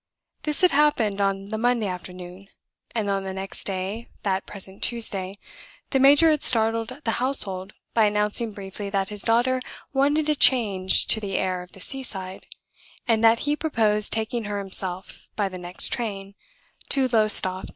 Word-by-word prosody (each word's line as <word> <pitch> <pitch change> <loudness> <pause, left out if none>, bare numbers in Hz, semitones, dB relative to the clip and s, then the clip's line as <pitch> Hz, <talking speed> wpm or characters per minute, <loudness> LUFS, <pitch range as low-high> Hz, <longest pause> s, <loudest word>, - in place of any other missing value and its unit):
This 300 -1 -3
had 365 -2 +5
happened 245 -9 +2
on 195 0 -1
the 220 0 -3
Monday 240 -1 +1
afternoon; 180 0 -8 0.5
and 220 -3 -1
on 195 -1 -1
the 190 0 -5
next 195 0 -4
day 195 +4 -4 0.2
(that 195 -1 -1
present 195 -1 -8
Tuesday) 200 -5 0 0.6
the 270 - +2
major 290 +4 +6
had 300 - 0
startled 225 +3 0
the 225 - 0
household 195 -7 -1 0.2
by 225 -2 +4
announcing 210 +2 0
briefly 200 0 -7
that 195 -1 -1
his 210 -1 -2
daughter 245 +4 +1 0.3
wanted 290 +3 +2
a 305 - +3
change 205 -10 +3
to 220 - +4
the 200 -3 -3
air 185 -1 -1
of 180 - -14
the - - -14
seaside, 195 -7 -6 0.6
and 225 -1 +2
that 225 0 +5
he 295 0 +1
proposed 220 -9 +1
taking 225 +1 -2
her 205 0 -3
himself, 190 -2 -1
by 205 -2 0
the 185 -1 -8
next 175 +1 -2
train, 200 -5 -4 0.6
to 270 -2 +2
Lowestoft. 215 -5 +5
210 Hz, 165 wpm, -24 LUFS, 195-240 Hz, 0.6 s, major